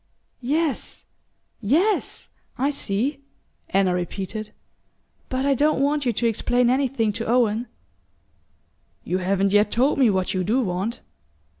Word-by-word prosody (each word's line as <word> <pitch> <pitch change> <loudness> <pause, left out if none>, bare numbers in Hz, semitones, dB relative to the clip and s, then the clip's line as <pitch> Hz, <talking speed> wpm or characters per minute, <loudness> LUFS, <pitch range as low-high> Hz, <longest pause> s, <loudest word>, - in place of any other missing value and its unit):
"Yes, 300 +4 -2 0.6
yes! 335 - +1 0.3
I 275 +3 +1
see," 265 +2 -1 0.5
Anna 190 -1 +2
repeated. 195 +4 -4 0.8
"But 260 +1 -1
I 280 - +3
don't 295 +3 +2
want 285 0 +1
you - - +3
to 235 +2 -2
explain 245 +2 +2
anything 255 -5 +1
to 225 +2 -4
Owen." 235 0 +2 1.4
"You 185 - -1
haven't 195 +1 +1
yet 210 0 +4
told 265 +6 +2
me 255 -4 +5
what 190 -2 0
you 185 -1 0
do 220 +8 +1
want." 195 +2 -2
235 Hz, 130 wpm, -23 LUFS, 200-270 Hz, 1.4 s, me